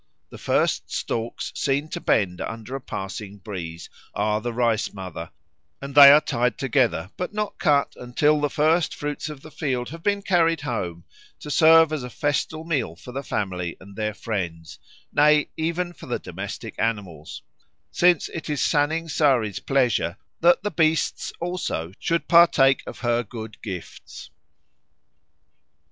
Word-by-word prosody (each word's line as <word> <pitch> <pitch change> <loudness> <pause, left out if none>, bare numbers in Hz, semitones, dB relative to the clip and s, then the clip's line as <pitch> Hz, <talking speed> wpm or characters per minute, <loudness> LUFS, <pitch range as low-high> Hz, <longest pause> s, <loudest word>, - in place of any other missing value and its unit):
The - - -10
first - - 0
stalks 115 0 -3
seen 140 +2 0
to - - -5
bend 90 -4 +1
under 115 +3 -6
a 135 - -5
passing 100 -2 -6
breeze 85 -5 -7 0.3
are 105 +1 0
the 120 +2 -3
Rice 115 -2 0
mother, 90 -4 -7 0.5
and 140 0 -7
they 140 -1 +11
are 145 - +8
tied 125 -4 -1
together 125 - 0
but 180 +3 -4
not 210 -1 -3
cut 145 -2 +2
until 145 +5 +1
the 145 - +1
first 155 +4 +2
fruits 145 +1 -4
of 150 -3 -9
the 155 - -12
field 130 -6 -2
have 165 +2 -9
been 200 +2 0
carried 165 -4 +2
home 90 - -4 0.4
to 150 - -6
serve 160 +1 +6
as 155 - -2
a 125 - -6
festal 145 +4 -2
meal 135 - -2
for 125 - -11
the 135 +2 -4
family 90 -9 -3
and 100 +1 -14
their 105 -1 -2
friends, 85 -7 -5 0.3
nay 150 0 +4
even 170 +2 -2
for - - -13
the 120 - -1
domestic 100 +4 -7
animals; 100 -9 -3 0.5
since 175 -2 +3
it 160 - -7
is 150 -2 -1
Saning 155 +3 +1
Sari's 130 - +1
pleasure 120 - +1 0.2
that 175 +3 +4
the 210 - -2
beasts 155 -1 +1
also 170 - -3
should 170 0 -1
partake 150 -6 +5
of - - -8
her 120 -1 +1
good 110 0 -9
gifts. 95 -6 -8
130 Hz, 155 wpm, -24 LUFS, 105-155 Hz, 0.5 s, they